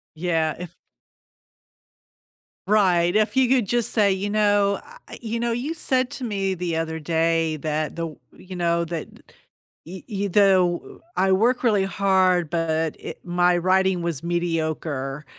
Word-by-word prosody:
Yeah, 160 -2 0
if 175 -1 -8 1.9
Right, 185 -4 +3
if 215 +3 +2
you 260 -2 +3
could 255 -4 +3
just 240 +3 0
say, 205 -3 +3
you 190 +2 -2
know, 205 -1 +2 0.3
I - - -9
you 230 0 -4
know, 235 0 -1
you 255 +8 -2
said 260 -5 0
to 260 - -7
me 195 -4 -1
the 175 -2 -3
other 160 0 -3
day 165 0 0
that 155 +1 -3
the 170 - -3
w 155 -3 -7
you 185 0 -11
know, 170 -1 0
that 165 -1 -5 0.8
y 180 +3 -9
y 200 -1 -2
the 185 -3 +2 0.2
I 190 0 +3
work 235 +6 +2
really 210 -5 +3
hard, 190 -3 +2
but 160 -1 -1
it - - -8
my 175 0 +2
writing 185 +1 +2
was 170 -4 -3
mediocre 160 -5 -2
180 Hz, 150 wpm, -23 LUFS, 165-205 Hz, 1.9 s, Right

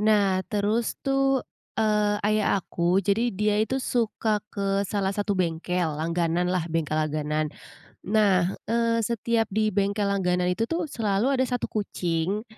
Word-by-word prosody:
nah 205 -3 +3
terus 210 +3 0
tuh, 270 -1 +2 0.3
eee, 210 -1 +2
ayah 210 -1 +2
aku, 175 -1 0
jadi 220 +5 +2
dia 210 +1 +2
itu 260 +5 0
suka 225 -4 0
ke 200 -1 -1
salah 200 -1 0
satu 205 0 -1
bengkel 180 0 0 0.2
langganan 170 +1 0
lah, 180 -2 0
bengkel 155 -2 0
langganan. 155 0 -1 0.5
Nah, 195 -3 +3 0.2
eee, 230 0 +2
setiap 230 0 0
di 215 +1 0
bengkel 200 +1 0
langganan 180 -2 +1
itu 225 +5 -1
tuh 335 +1 -1
selalu 230 -3 0
ada - - +4
1 245 -1 -2
kucing 190 0 -1
205 Hz, 145 wpm, -26 LUFS, 180-220 Hz, 0.5 s, ada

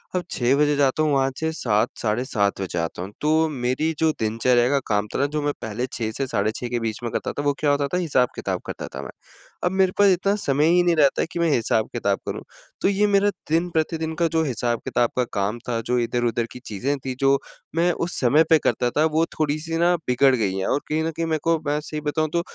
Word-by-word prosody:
अब 180 - 0
6 125 +2 +2
बजे 150 0 +3
जाता 140 +2 +2
हूँ 150 - +1
वहाँ 135 0 +2
से 160 0 -1
7 110 -8 +1
साढ़े 110 +3 0
7 100 -5 0
बजे 90 -2 -3
आता 85 +1 -3
हूँ। 95 +2 -6
तो 160 +1 +3
मेरी 135 +4 -1
जो 160 -1 +3
दिनचर्या 120 +3 +2
का 140 -1 +2
काम 105 0 0
था - - 0
ना, 140 - +3
जो 150 +1 -2
मैं 145 0 0
पहले 110 +3 -3
6 110 -2 -2
से 135 -1 -1
साढ़े 105 -1 0
6 125 - -4
के 120 -1 -1
बीच 110 -2 -3
में 120 - -3
करता - - -2
था, 145 - -4
वो 145 0 +2
क्या 145 -2 +2
होता 140 0 +1
था - - +2
हिसाब-किताब 140 -8 0
करता - - -6
था - - -4
मैं, - - -8 0.5
अब 180 - +2
मेरे 190 -1 +2
पास 205 -1 +6
इतना 195 +3 +1
समय 145 +2 +2
ही 180 0 +4
नहीं 175 -1 +3
रहता 145 -3 +3
कि - - -4
मैं 170 -1 +2
हिसाब-किताब 110 -4 0
करूँ। - - -3 0.4
तो - - +3
ये 200 +1 +2
मेरा 200 0 +3 0.2
दिन-प्रतिदिन 160 -1 0
का 170 0 +2
जो 160 0 +1
हिसाब-किताब 120 -2 0
का 125 - +3
काम 100 +3 -1
था, 115 -1 0
जो 125 +2 -1
इधर-उधर 120 0 0
की 125 - -9
चीज़ें 130 +8 -2
थी, 130 -1 -4
जो 135 0 +4 0.4
मैं 175 +1 +3
उस 170 +1 -3
समय 145 +6 +5
पे 160 - +7
करता 125 - +1
था, 150 - +2
वो 160 +1 +2
थोड़ी-सी 155 +2 -1
ना 175 +1 +3
बिगड़ 130 +2 +4
गई 100 -5 -1
है 95 0 -2
और 140 - +1
कहीं 155 +1 0
न 165 - -1
कहीं 165 +1 -3
मेरे 160 -1 0
को 165 0 +3
मैं 150 +1 +1
सही 155 0 -5
बताऊँ 155 +1 -1
तो 170 - +2
145 Hz, 240 wpm, -23 LUFS, 120-160 Hz, 0.5 s, पे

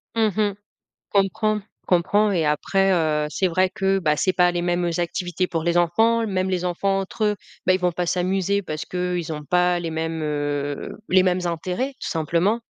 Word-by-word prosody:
Mmh 225 -1 +3
mh. 210 -1 +1 0.6
Comprends, 210 +2 +1 0.3
comprends 205 +4 +3
et 170 -4 +1
après, 195 +6 +2
heu, 155 -3 +1
c'est 190 - 0
vrai 185 +1 +2
que, 195 +1 +1
bah, 150 -4 +2
c'est 185 - +1
pas 180 -1 +4
les 175 0 -2
mêmes, 175 0 0
heu, 170 - 0
activités 175 +1 -2
pour 165 -2 -2
les 170 +1 +2
enfants, 225 +7 +3
même 190 -2 -1
les 180 -1 -1
enfants 195 +2 0
entre 195 +3 -3
eux, 210 -1 +1 0.3
bah, 185 - +4
ils 185 - +1
vont 180 -1 +1
pas 175 +1 -2
s'amuser 190 +3 0
parce 155 -4 -5
qu'ils 180 -2 -3
ont 150 -1 -6
pas 180 +2 +2
les 170 -1 -4
mêmes, 160 0 -3
heu, 145 -1 -3
les 185 0 +5
mêmes 185 0 +1
intérêts 180 - -2
tout - - -4
simplement, 170 +7 +1
180 Hz, 200 wpm, -23 LUFS, 165-195 Hz, 0.6 s, les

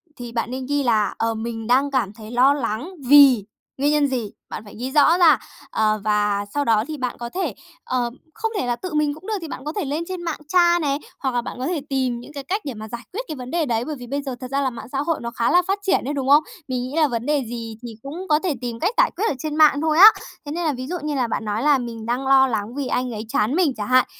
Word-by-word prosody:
thì 240 -1 -8
bạn 235 +1 -2
nên 260 0 -4
ghi 285 +1 0
là 220 -5 +2
"Ờ, 225 0 0
mình 225 0 -5
đang 270 +4 +3
cảm 240 -7 0
thấy 215 0 -11
lo 255 +3 +5
lắng 270 - -3
vì" 275 -5 +7 0.3
nguyên 285 +2 +2
nhân 300 -1 +3
gì? 245 -6 -3 0.2
Bạn - - -6
phải 205 - -12
ghi 255 +2 -3
rõ 300 +4 +5
ra. 320 -8 +6 0.3
Ờ, 215 -1 +1
và 210 -1 +1
sau 290 0 0
đó 220 -2 +3
thì 310 -1 -5
bạn 250 -2 -3
có 235 0 -5
thể, 375 +9 -2 0.3
ờ 245 -2 -1 0.2
không 450 0 -3
thể - - -1
là 240 -1 0
tự 365 +7 -7
mình 300 -1 +1
cũng 315 +6 -13
được 440 - -1
thì 330 - -6
bạn 270 - -8
có 305 - -3
thể 400 - -1
lên 295 +4 -2
trên 370 -2 -5
mạng 330 -3 -3
tra 345 +1 +4
này, 280 -2 0 0.2
hoặc 265 -2 -1
là 240 - +2
bạn 235 - -7
có 260 - -2
thể 345 -4 -1
tìm 260 -3 0
những 250 +5 -12
cái 280 -2 -6
cách 395 +8 -2
để 275 - -3
mà 215 -1 -8
giải 235 +2 -6
quyết 440 - -2
cái 310 - -5
vấn 255 -1 -8
đề 335 -2 +1
đấy. 235 -2 -1
Bởi 305 - -4
vì 245 - -9
bây 280 +3 -2
giờ 270 -3 -5
thật 255 - -5
ra 275 +1 +1
là 270 - +1
mạng 240 - -9
xã 275 - -2
hội 325 +2 0
nó 235 0 -4
khá 235 0 0
là 355 - +6
phát 390 +1 0
triển 390 -9 +1
ấy, 285 - -2
đúng 270 -2 -2
không? 295 +2 +7 0.2
Mình 255 -2 -2
nghĩ 255 +3 -6
là 320 -2 +4
vấn 235 -3 -3
đề 295 -1 +1
gì 230 -2 -6
thì 235 -2 -8
cũng 330 +8 -7
có 300 0 +4
thể 355 -2 -1
tìm 235 -2 -4
cách 380 - 0
giải - - +4
quyết 395 +6 -1
ở - - 0
trên 300 +2 -3
mạng 305 -2 +5
thôi 315 -1 +1
á. 390 +5 +11 0.4
Thế 290 - -5
nên 345 +3 -2
là 305 - +1
ví 255 0 -6
dụ 355 - -3
như 300 -1 -2
là 255 -3 +1
bạn 225 - -3
nói 210 +1 -1
là 295 -1 +5
"Mình 235 -3 -6
đang 250 +3 -2
lo 265 0 +6
lắng 225 -1 -3
vì 280 -2 -2
anh 250 0 -1
ấy 220 0 -5
chán 220 +5 +1
mình 335 -6 +2
chẳng 210 - -3
hạn." 255 0 +5
265 Hz, 300 wpm, -22 LUFS, 235-300 Hz, 0.4 s, á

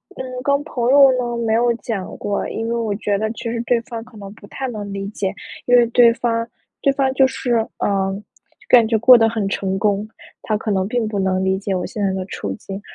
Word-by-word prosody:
嗯， 255 -1 -6
跟 280 +1 +1
朋 245 -4 -2
友 275 0 +7
呢 240 -1 -2
没 220 - +1
有 235 +1 +3
讲 215 -4 -5
过， 205 -1 -2
因 225 - -4
为 235 - -1
我 225 -3 -1
觉 205 0 -1
得 215 +2 -1
其 230 - -9
实 230 0 -2
对 240 0 +1
方 230 -2 -7
可 230 -1 -16
能 200 -1 -9
不 205 -2 -15
太 265 - -5
能 205 -4 -6
理 195 0 -4
解。 200 -2 -3 0.3
因 245 - +4
为 240 - +5
对 235 0 +5
方 230 -1 -1 0.3
对 275 - +3
方 270 -1 0
就 265 0 +4
是， 250 -1 -2 0.2
呃， 195 0 -1 0.5
感 235 -3 +6
觉 225 -1 +2
过 250 +3 +8
得 225 -1 +3
很 220 -3 -2
成 190 -1 -2
功， 205 +1 0 0.3
他 215 - -1
可 215 0 -3
能 190 -1 0
并 235 -1 -1
不 210 -2 -3
能 190 0 0
理 190 0 +1
解 195 -1 -2
我 180 - -2
现 215 -5 -4
在 195 - +1
的 190 -1 -3
处 100 - -5
境。 195 - -8
225 Hz, 255 characters per minute, -20 LUFS, 200-240 Hz, 0.5 s, 过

